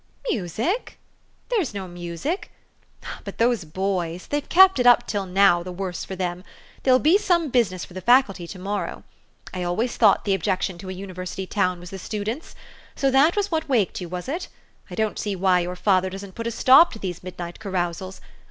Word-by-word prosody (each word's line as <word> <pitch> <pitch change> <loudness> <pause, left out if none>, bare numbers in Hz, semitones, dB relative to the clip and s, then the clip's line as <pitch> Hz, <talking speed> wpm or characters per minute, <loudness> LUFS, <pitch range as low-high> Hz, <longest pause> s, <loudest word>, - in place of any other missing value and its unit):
" - - -7
"Music? 230 - -2 0.5
There's 390 - 0
no 190 -2 -4
music, 175 - -4 0.7
but - - -8
tjiose 230 -9 +1
boys: 180 -1 -2
they've 290 0 -3
kept 380 -4 +7
it 245 - +3
up 240 0 +6
till 200 -4 -3
now, 185 -1 +4
the 180 +1 -7
worse 180 -1 -4
for 190 - -6
them! 180 -1 -3 0.4
There'll 255 -1 +5
be 320 +9 +4
some 350 -7 +1
business 195 -8 +1
for - - -16
the 185 - -6
Faculty 200 -5 +3
to 190 - -8
morrow. 200 +3 -4 0.5
I 185 - -4
always 180 +8 -1
thought - - +4
the 200 - +2
objection 190 -2 -1
to 185 - -8
a - - -4
university 185 0 -6
town 185 -2 0
was 175 0 -10
the 195 - -7
students. 215 - -5 0.4
So 275 -1 +1
that 280 +6 +4
was 410 -2 -1
what 315 -2 -1
waked 220 -8 +1
you, 175 - -6
was 180 0 -5
it? 320 +7 -3 0.4
I - - -7
don't 220 -2 -1
see 205 -2 -2
why 185 -1 +3
your 180 +1 -3
father 185 0 +2
doesn't 195 0 -8
put 230 +3 -5
a - - -1
stop 265 +8 +6
to - - -8
these 185 -5 -5
midnight 175 -1 -7
carousals. 185 -1 -3
195 Hz, 200 wpm, -23 LUFS, 180-245 Hz, 0.7 s, kept